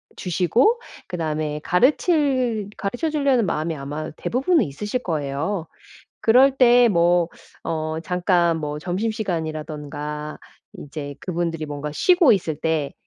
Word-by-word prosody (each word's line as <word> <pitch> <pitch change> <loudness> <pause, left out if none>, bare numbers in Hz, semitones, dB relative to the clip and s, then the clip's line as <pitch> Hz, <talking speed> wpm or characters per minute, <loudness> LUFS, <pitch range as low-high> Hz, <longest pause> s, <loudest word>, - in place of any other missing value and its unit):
주시고 195 - +2 0.3
그 180 - -5
다음에 155 -2 -2
가르칠 255 - +2
가르쳐 245 +10 -2
주려는 275 -7 +2
마음이 160 +1 -1
아마 145 +2 -5
대부분은 275 - +1
있으실 210 - -4
거예요. 155 +3 -2 0.6
그럴 255 +5 +6
때 245 -1 +6
뭐 175 -2 +3 0.4
어 155 -1 -2
잠깐 175 -1 +1
뭐 150 0 -4
점심시간이라든가 155 -7 -4 0.4
이제 145 0 -7
그분들이 170 -3 -2
뭔가 145 0 -5
쉬고 355 - +5
있을 165 -5 -1
때 160 -3 -1
170 Hz, 275 characters per minute, -22 LUFS, 155-230 Hz, 0.6 s, 그럴